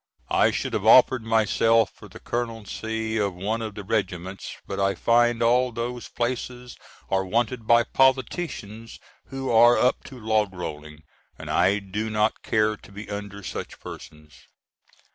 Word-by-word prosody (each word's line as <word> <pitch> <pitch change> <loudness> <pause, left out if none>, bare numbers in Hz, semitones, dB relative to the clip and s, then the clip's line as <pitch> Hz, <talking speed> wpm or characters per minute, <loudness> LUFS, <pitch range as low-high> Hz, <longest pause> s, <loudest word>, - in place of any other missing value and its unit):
I - - +4
should - - -3
have - - -1
offered 125 +2 +6
myself 115 0 +3
for - - -14
the - - -13
Colonelcy 110 -1 -3
of 100 -3 -1
one 105 +5 -2
of 110 -2 -5
the 105 - -7
Regiments, 95 -3 -3
but - - -5
I 100 0 +1
find 120 +3 +2
all 125 +2 +3
those 120 +1 -5
places 125 0 -4 0.4
are 95 0 +2
wanted 115 +3 -1
by 120 0 +6
politicians 130 -4 -1 0.3
who 135 0 -4
are 120 +1 +6
up 125 - +2
to 130 -2 -10
log 110 -3 0
rolling, 75 -3 -7 0.3
and - - -7
I 95 +3 +3
do 105 +2 -4
not 105 0 0
care 110 0 +1
to - - -17
be 100 +2 -9
under 100 0 -6
such - - -6
persons. 75 -1 -11
110 Hz, 155 wpm, -25 LUFS, 100-120 Hz, 0.4 s, offered